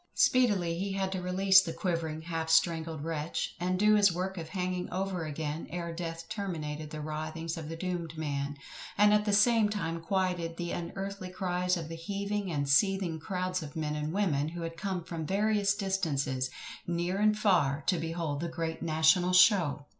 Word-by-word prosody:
Speedily 195 -10 +3
he 195 +1 -2
had 190 -1 -1
to 190 -1 -3
release 190 +1 +5
the 165 -3 -4
quivering 165 -3 -2
half 165 -1 -3
strangled 160 -2 +2
wretch, 160 0 -3
and 180 +1 0
do 210 +2 +5
his 205 -2 +5
work 185 +2 -3
of 165 -3 -6
hanging 180 -1 -2
over 185 -3 -2
again, 155 +1 -4
ere 170 -1 -4
death 165 -1 -5
terminated 155 -8 -4
the 155 0 -6
writhings 155 +2 -4
of 160 -2 -6
the 165 - -4
doomed 170 -2 -4
man, 145 -2 -3 0.4
and 210 +1 +6
at 210 0 +3
the 210 - +1
same 215 +1 +4
time 170 -6 -3
quieted 180 -2 -1
the 175 -1 -3
unearthly 195 +2 -5
cries 180 0 0
of 165 -2 -5
the 165 - -6
heaving 200 +2 -3
and 140 -3 -1
seething 180 +2 +2
crowds 185 0 -2
of 150 -2 -8
men 150 -1 -2
and 150 +1 -2
women 165 -7 +1
who 170 +1 -5
had 165 0 -5
come 185 0 -3
from 165 -1 -5
various 200 +2 +2
distances, 150 -10 -1 0.4
near 175 +2 -1
and 210 0 +3
far, 155 -9 +2
to 180 - +2
behold 165 -3 -3
the 170 +2 -3
great 160 0 -4
NATIONAL 165 +3 +3
SHOW! 180 -6 +5
170 Hz, 185 wpm, -30 LUFS, 160-190 Hz, 0.4 s, and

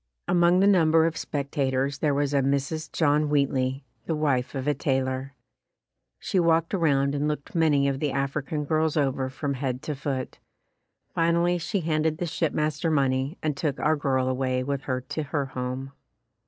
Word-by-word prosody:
Among 175 +1 +4
the - - +5
number 165 -5 +5
of 165 0 0
spec 140 -1 -4
tators 135 -1 0
there 145 -3 +1
was 145 0 0
a 140 - +3
Mrs. 140 +4 -1
John 150 -1 +2
Wheatley, 135 -2 0 0.2
the 160 - 0
wife 140 -4 0
of 135 -1 -3
a 150 - +3
tailor. 130 0 -2 0.8
She 190 - -1
walked 165 0 +2
around 140 -6 +2
and 145 +1 0
looked 150 -2 -4
many 150 -4 +3
of 135 -1 -1
the 150 -1 0
African 140 +2 -2
girls 155 +1 +1
over 135 -2 0
from 140 +2 -3
head 130 -1 -3
to 150 - -3
foot. 135 -2 -4 0.7
Final 170 +1 +2
ly 175 0 +2
she 185 +4 -2
handed 155 -1 0
the 175 - -2
shipmaster 155 0 -1
money 135 +1 +1
and 155 -2 0
took 145 -2 -2
our 155 +1 +2
girl 130 -3 0
away 130 0 0
with 140 0 -2
her 130 -1 -1
to 155 - -4
her 145 -1 -2
home. 130 +1 -5
145 Hz, 180 wpm, -26 LUFS, 135-155 Hz, 0.8 s, the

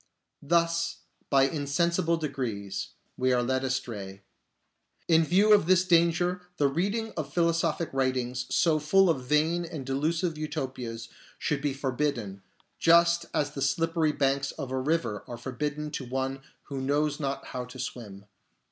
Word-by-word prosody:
Thus, 170 +2 +1 0.3
by 135 -1 +5
insensible 165 +4 +1
degrees, 125 -10 -3 0.3
we 130 0 +2
are 125 -1 +2
led 130 +1 0
astray. 105 -7 -4 0.8
In 165 -1 +5
view 195 +7 +4
of 200 -6 +4
this 185 0 +4
danger 175 +1 +3 0.2
the 145 - +3
reading 205 +10 -1
of 150 -4 -4
philosophic 165 -1 +1
writings 130 -2 -1
so 160 -2 +3
full 180 +4 +4
of 130 -5 -3
vain 155 +5 +2
and 160 -5 -6
delusive 155 +4 -1
Utopias 125 -6 -4 0.3
should 150 -3 -1
be 145 -2 -1
for 135 -1 -2
bidden, 120 -8 -2 0.4
just 170 +1 +5
as 145 -1 0
the 140 - -6
slippery 160 +3 +1
banks 135 -1 0
of 140 -4 -6
a 130 - -1
river 135 -7 -1
are 120 - -6
forbidden 150 +5 -4
to 140 -3 -4
one 135 +2 -3 0.2
who 135 -2 -5
knows 145 +2 0
not 140 -2 -3
how 125 - -3
to 125 +1 -11
swim. 105 -6 -7
145 Hz, 150 wpm, -28 LUFS, 130-165 Hz, 0.8 s, by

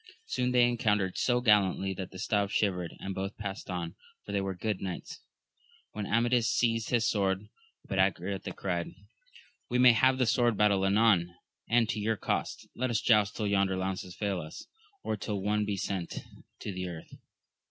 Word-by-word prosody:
Soon 125 - -1
they 125 -1 +5
encountered 105 -6 +1
so 125 -1 +1
gallantly, 100 -4 +3
that 95 -1 -6
the 95 - -11
staves 100 -1 0
shivered, 90 -5 0
and 95 - -4
both 95 +2 -4
passed 100 -1 -6
on, 85 -2 -3 0.3
for - - -7
they 100 -1 0
were 95 -1 -3
good 105 +1 -2
knights. 95 -2 -6 0.7
Then 105 -2 -4
Amadis 120 +1 +2
seized 115 -2 +1
his 115 -2 +2
sword, 95 -2 0 0.4
but - - -2
Angriote - - 0
cried, - - -3 0.7
We 125 - +1
may 125 0 +8
have 130 +3 +4
the 130 - +2
sword 120 -1 +2
battle 100 -2 +3
anon, 95 -4 +3 0.3
and 115 -1 +4
to 115 -2 -1
your 110 +1 0
cost; - - -2
let 130 +1 -1
us 115 -3 +1
joust 105 -2 +3
till 110 - -2
yonder 100 -2 +2
lances 95 -1 -3
fail 100 -3 -2
us, 75 - -9 0.4
or 110 - -1
tiU 105 +1 -3
one 105 +2 0
be 100 -1 -2
sent 95 -2 -3 0.5
to - - -4
the 90 0 -4
earth. 80 -2 -9
105 Hz, 180 wpm, -30 LUFS, 95-115 Hz, 0.7 s, may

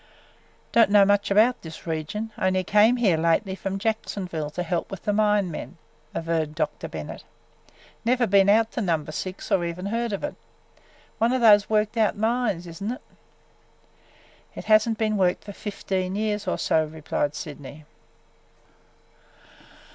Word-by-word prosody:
"Don't 230 -3 +5
know 205 -1 +6
much 205 0 +2
about 220 +5 +4
this 160 -1 -10
region; 165 +7 -4
only 185 0 +1
came 210 +6 +4
here 200 -9 +3
lately 170 +5 +1
from 195 0 -4
Jacksonville 195 -7 -3
to 180 +4 -4
help 170 0 -2
with 195 - -8
the 210 - 0
mine 210 -3 +2
men," 165 - -7 0.4
averred 160 -2 -1
Dr. 165 - -3
Bennett. - - -7 0.8
"Never 245 +1 +2
been 200 -1 +4
out 225 +2 +4
to 240 - -3
Number 160 -6 -1
Six 185 +4 -6
or 175 - +3
even 170 +2 -4
heard 230 +3 -1
of 200 - -4
it. 295 - -3 0.9
One 230 +2 +3
of 260 -1 0
those 210 -3 +6
worked 215 +1 +1
out 215 -3 +2
mines, 220 -5 0
is 170 +2 -10
n't 215 +4 -2
it?" - - -10 1.5
"It - - -8
has 215 +1 +5
n't 225 - -1
been 215 -1 0
worked 180 -2 +1
for 205 - -9
fifteen 190 -2 -3
years 210 -1 -2
or - - 0
so," 160 - +2
replied 150 -1 -3
Sydney. 145 0 -9
200 Hz, 160 wpm, -25 LUFS, 170-220 Hz, 1.5 s, know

